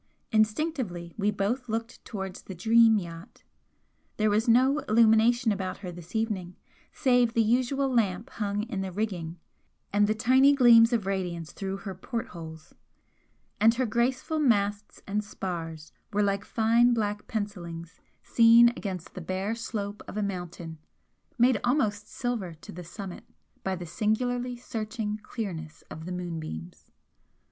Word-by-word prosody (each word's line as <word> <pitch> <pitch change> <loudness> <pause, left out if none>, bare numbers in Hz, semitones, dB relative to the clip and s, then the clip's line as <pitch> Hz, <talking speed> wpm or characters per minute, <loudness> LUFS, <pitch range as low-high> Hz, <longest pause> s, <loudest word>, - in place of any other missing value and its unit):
Instinctively 215 - 0
we 205 0 +1
both 215 +5 -1
looked 225 +1 -4
towards 195 -3 -6
the 190 - -9
'Dream' 225 +4 +5
yacht, 170 -2 -8 0.7
there 215 -1 +2
was 215 +4 +1
no 260 +5 +4
illumination 225 +1 +4
about 190 -2 -3
her 180 - -4
this 175 +3 -12
evening 205 -6 -2 0.4
save 245 -3 +2
the 230 - +4
usual 255 +4 +1
lamp 215 -6 0
hung 205 -1 -2
in 220 -4 -4
the 190 -1 -4
rigging 180 -4 -3 0.6
and 205 0 +4
the 215 - +1
tiny 260 +5 +5
gleams 235 -3 +7
of 230 -5 0
radiance 180 -4 -3
through 195 0 -4
her 195 -1 -6
port 230 +6 -5
holes, 160 -2 -10 0.9
and 225 +2 +5
her 255 +1 +1
graceful 250 +7 0
masts 205 -6 0
and 210 +1 -1
spars 165 -6 -6 0.2
were 210 0 +2
like 200 0 0
fine 235 +2 +3
black 210 -2 -2
pencillings 175 -6 -5 0.2
seen 230 0 +7
against 190 -7 -6
the 185 - -7
bare 190 +5 -2
slope 210 -3 -4
of - - -7
a 210 - 0
mountain 175 -4 -5 0.6
made 240 -2 +4
almost 220 -6 +1
silver 225 -9 -3
to 155 - -12
the 180 +1 -8
summit 185 +2 -8 0.4
by 190 0 -1
the 175 -1 -7
singularly 245 +7 -1
searching 215 -2 -4
clearness 170 -10 -6
of 160 - -8
the 180 - -5
moonbeams. 160 - -6
210 Hz, 145 wpm, -28 LUFS, 185-235 Hz, 0.9 s, gleams